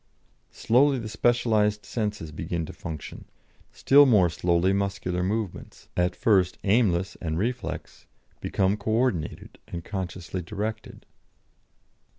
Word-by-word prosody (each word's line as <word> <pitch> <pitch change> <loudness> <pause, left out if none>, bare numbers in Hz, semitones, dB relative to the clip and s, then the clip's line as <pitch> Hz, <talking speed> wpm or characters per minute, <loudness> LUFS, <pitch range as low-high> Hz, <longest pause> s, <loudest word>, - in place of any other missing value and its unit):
Slowly 135 +4 +3
the 115 -3 -5
specialised 110 -2 +1
senses 105 -9 -3
begin 80 +2 -3
to - - -9
function; 80 -3 -8 0.5
still 145 +1 +6
more 100 -8 +5
slowly 85 +3 +2
muscular 100 -2 -1
movements, 100 0 -4
at 90 +1 +1
first 95 -5 +2
aimless 95 -4 +2
and 80 -2 -2
reflex, 120 +6 -4 0.3
become 95 +2 0
co 105 +1 -5
ordinated 110 -7 -1
and 85 -1 -7
consciously 95 -2 -5
directed. 105 +5 -5
100 Hz, 115 wpm, -26 LUFS, 90-110 Hz, 0.5 s, still